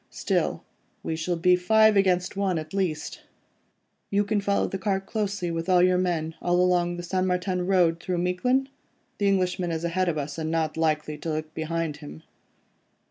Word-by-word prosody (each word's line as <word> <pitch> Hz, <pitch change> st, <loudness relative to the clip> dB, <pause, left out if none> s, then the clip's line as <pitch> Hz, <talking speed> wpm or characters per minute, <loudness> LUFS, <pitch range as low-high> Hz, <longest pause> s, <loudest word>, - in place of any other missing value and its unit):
Still, -, -, -1 dB, 0.4 s
we 160 Hz, -, -2 dB
shall 170 Hz, +2 st, -2 dB
be 180 Hz, +2 st, +4 dB
five 220 Hz, +4 st, +4 dB
against 185 Hz, -1 st, +2 dB
one 195 Hz, -3 st, 0 dB
at 155 Hz, +1 st, -6 dB
least. 185 Hz, -6 st, -2 dB, 0.9 s
You 205 Hz, 0 st, +2 dB
can 205 Hz, 0 st, 0 dB
follow 200 Hz, 0 st, +1 dB
the 195 Hz, -, -4 dB
cart 195 Hz, -1 st, -1 dB
closely 205 Hz, -4 st, -2 dB
with 165 Hz, +1 st, -3 dB
your 180 Hz, 0 st, +4 dB
men, 165 Hz, -3 st, -1 dB
all 175 Hz, 0 st, +1 dB
along 175 Hz, -1 st, +2 dB
the 175 Hz, -, -6 dB
St. 185 Hz, +1 st, -1 dB
Martin 180 Hz, 0 st, -1 dB
Road, 175 Hz, -4 st, +3 dB
through 180 Hz, +1 st, -3 dB
Miquelon. 250 Hz, +10 st, +1 dB, 0.5 s
The 205 Hz, -, +2 dB
Englishman 185 Hz, -2 st, +1 dB
is 165 Hz, 0 st, -3 dB
ahead 180 Hz, +2 st, 0 dB
of 160 Hz, -, -2 dB
us, 145 Hz, +2 st, -4 dB
and 160 Hz, 0 st, -2 dB
not 160 Hz, -1 st, -1 dB
likely 155 Hz, -2 st, -1 dB
to 165 Hz, -, -5 dB
look 155 Hz, 0 st, -4 dB
behind 160 Hz, -1 st, -3 dB
him." 75 Hz, +2 st, -11 dB
180 Hz, 180 wpm, -26 LUFS, 165-190 Hz, 0.9 s, be